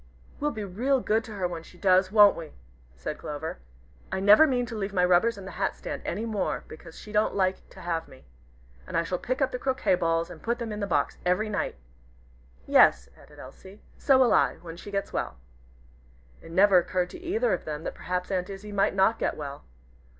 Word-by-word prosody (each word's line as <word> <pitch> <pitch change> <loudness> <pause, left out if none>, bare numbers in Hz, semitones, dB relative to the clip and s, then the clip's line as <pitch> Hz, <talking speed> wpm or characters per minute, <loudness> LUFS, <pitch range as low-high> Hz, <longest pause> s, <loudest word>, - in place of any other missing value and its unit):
"We'll 295 - 0
be 220 -7 -5
real 245 +8 0
good 225 -1 +1
to 220 - -9
her 190 -3 -1
when 170 -2 -6
she 175 - -17
does, 185 0 +3
won't 205 -2 +7
we?" 160 -2 -9 0.4
said 60 - -6
Clover. 150 - -5 0.5
"I - - -1
never 210 +10 +7
mean 250 -3 0
to 230 - -7
leave 200 -2 -3
my 180 -1 +4
rubbers 185 +6 +3
in 195 - -9
the 190 - -7
hat 195 - -2
stand - - -6
any 210 +6 -3
more, 215 -3 -2
because 160 +1 -12
she 210 - -11
don't 210 0 +1
like 190 -1 0
to - - -13
have 165 -1 -2
me. 130 - -17 0.6
And - - -2
I 165 - +2
shall 175 +2 -3
pick 255 +3 -1
up 265 - 0
the 250 - -4
croquet 260 -4 +1
balls 165 -2 0
and - - -11
put 235 +1 -1
them 235 -2 -5
in 210 - -5
the 200 - -2
box 180 - 0
every 180 +5 +1
night." 205 - -2 0.9
"Yes," 60 0 +5
added - - -18
Elsie, 190 +2 -13 0.2
"so 270 -2 +4
will 255 -3 +4
I, - - +3
when 165 -1 -8
she 185 - -10
gets 200 -1 -3
well." - - -3 1.0
It - - -13
never 190 +2 +5
occurred 180 +1 -2
to - - -9
either 430 +8 0
of - - -3
them 150 0 -5
that - - -4
perhaps 180 +1 -4
Aunt 185 -1 -1
Izzie 200 +1 -8
might 200 -1 +1
not 195 +4 +3
get - - -1
well. 140 -2 -7
195 Hz, 220 wpm, -27 LUFS, 175-220 Hz, 1.0 s, won't